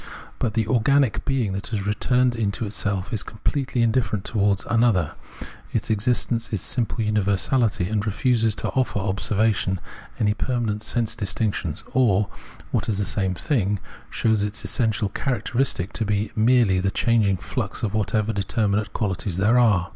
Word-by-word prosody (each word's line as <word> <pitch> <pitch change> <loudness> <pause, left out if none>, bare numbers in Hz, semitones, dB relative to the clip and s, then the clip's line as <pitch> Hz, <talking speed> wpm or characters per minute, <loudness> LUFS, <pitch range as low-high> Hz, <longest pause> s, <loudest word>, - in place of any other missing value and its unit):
But 115 -3 -1
the 110 -2 +2
organic 130 +2 +2
being 125 -8 0
that 100 +1 -4
has 105 -4 -3
returned 125 +4 +2
into 110 0 -1
itself 100 0 -2
is 110 - -1
completely 125 +2 -1
indifferent 115 -4 0
towards 100 -3 +1
an 115 0 +2
other; 95 -10 +2 0.6
its 110 0 -1
existence 115 +2 0
is 105 - -1
simple 115 +2 -1
universahty, 105 0 +1
and 105 -2 0
refuses 110 +1 +1
to - - -2
offer 130 -5 0
observation 100 0 0 0.4
any 105 -1 +2
permanent 110 -2 -1
sense 115 0 -1
distinctions, 100 -6 -2
or, 105 -6 +3 0.4
what - - -1
is 105 - 0
the 100 - 0
same 95 -2 -1
thing, 105 - 0 0.3
shows 110 -2 +1
its 105 +1 -4
essential 110 -4 0
characteristic 120 -4 -1
to 115 - -1
be 105 0 -1
merely 110 -4 +4
the 95 +1 +1
changing 105 -2 +2
flux 85 - -4
of 105 -2 -1
whatever 110 +1 0
determinate 100 +1 0
qualities 95 -4 -2
there 110 +6 +4
are. 100 -7 +3
110 Hz, 155 wpm, -23 LUFS, 100-115 Hz, 0.6 s, merely